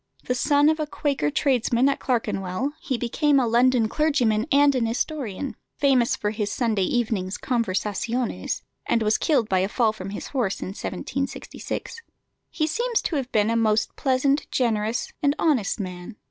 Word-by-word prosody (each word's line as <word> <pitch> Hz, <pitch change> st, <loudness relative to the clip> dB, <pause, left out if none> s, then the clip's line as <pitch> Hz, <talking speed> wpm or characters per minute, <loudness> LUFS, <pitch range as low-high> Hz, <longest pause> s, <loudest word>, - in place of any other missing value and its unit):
The 250 Hz, -, -1 dB
son 285 Hz, +3 st, +3 dB
of 315 Hz, 0 st, +2 dB
a 305 Hz, -, -1 dB
Quaker 280 Hz, -, -1 dB
tradesman 250 Hz, -, +2 dB
at 280 Hz, -, +1 dB
Clerkenwell, 225 Hz, 0 st, -1 dB
he 260 Hz, -, -2 dB
became 275 Hz, +4 st, +2 dB
a 255 Hz, -, +2 dB
London 240 Hz, 0 st, +3 dB
clergyman 250 Hz, -5 st, +1 dB
and 285 Hz, 0 st, +5 dB
an 245 Hz, -3 st, +1 dB
historian, 255 Hz, -, -3 dB, 0.2 s
famous 260 Hz, -4 st, +3 dB
for 210 Hz, -, -2 dB
his 210 Hz, -2 st, -2 dB
Sunday 220 Hz, -6 st, +1 dB
evenings' 215 Hz, -6 st, -1 dB
conversaziones, 230 Hz, +1 st, -2 dB, 0.2 s
and 230 Hz, -1 st, +2 dB
was 215 Hz, 0 st, +2 dB
killed 275 Hz, -9 st, +2 dB
by 190 Hz, -2 st, +2 dB
a 190 Hz, +2 st, 0 dB
fall 220 Hz, -1 st, +2 dB
from 195 Hz, -3 st, -7 dB
his 205 Hz, -, -6 dB
horse 240 Hz, -9 st, -1 dB
in -, -, -5 dB
1766. 220 Hz, -, -5 dB, 0.5 s
He 310 Hz, -, -1 dB
seems 470 Hz, +9 st, 0 dB
to 330 Hz, -, -2 dB
have 265 Hz, -2 st, -3 dB
been 215 Hz, +1 st, +2 dB
a -, -, +1 dB
most 220 Hz, -1 st, +1 dB
pleasant, 275 Hz, +2 st, +1 dB
generous, 225 Hz, -2 st, 0 dB
and 285 Hz, 0 st, +2 dB
honest 255 Hz, -11 st, +1 dB
man. 185 Hz, +2 st, -6 dB
240 Hz, 165 wpm, -24 LUFS, 215-280 Hz, 0.5 s, and